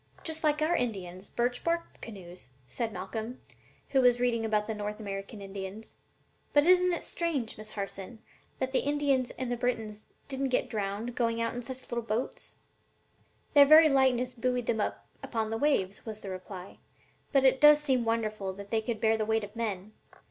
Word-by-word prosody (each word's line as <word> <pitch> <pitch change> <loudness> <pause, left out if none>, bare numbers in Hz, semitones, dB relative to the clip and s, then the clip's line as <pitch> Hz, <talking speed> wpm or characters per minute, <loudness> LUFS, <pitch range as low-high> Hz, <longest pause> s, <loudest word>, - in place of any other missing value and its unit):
"Just 320 0 -3
like 305 0 +2
our 335 +3 +2
Indians' 190 - -3
birch 245 +1 -1
bark 335 0 -2
canoes," 180 - -10 0.2
said 225 - -3
Malcolm, 220 +6 -5 0.5
who 270 - +3
was 245 -1 +5
reading 240 -2 +1
about 215 -1 +1
the 220 - -3
North 210 0 -4
American 200 0 -6
Indians. 195 +2 -7 0.6
"But 290 0 +5
isn't 360 0 +5
it 345 - -2
strange, 295 -10 -2
Miss 215 0 -8
Harson, 200 +2 -6 0.4
that 260 0 -2
the 265 - +3
Indians 280 -3 +1
and 255 -2 -3
the 245 - -1
Britons 225 -3 -3 0.2
didn't 270 -1 -2
get 250 - 0
drowned 210 +2 -3
going 230 -1 0
out 230 0 0
in 245 - -4
such 260 +1 -7
little 240 - -3
light 230 - -8
boats?" 225 +4 -3 1.0
"Their 285 -1 +9
very 310 +1 +9
lightness 255 -2 +3
buoyed 250 0 -1
them 220 -2 0
up - - -3 0.2
upon 220 -2 -2
the 225 - -1
waves," 210 -10 +1
was 215 -2 -7
the 195 - -6
reply; 185 0 -8 0.5
"but 275 -2 +4
it 265 +1 +4
does 295 0 +9
seem 265 -5 +1
wonderful 215 -4 -1
that 200 +1 -10
they 225 -1 +2
could 220 0 -3
bear 220 0 +3
the 215 - -1
weight 220 0 +1
of 205 +2 -8
men. 210 -3 -3
230 Hz, 190 wpm, -30 LUFS, 210-260 Hz, 1.0 s, Their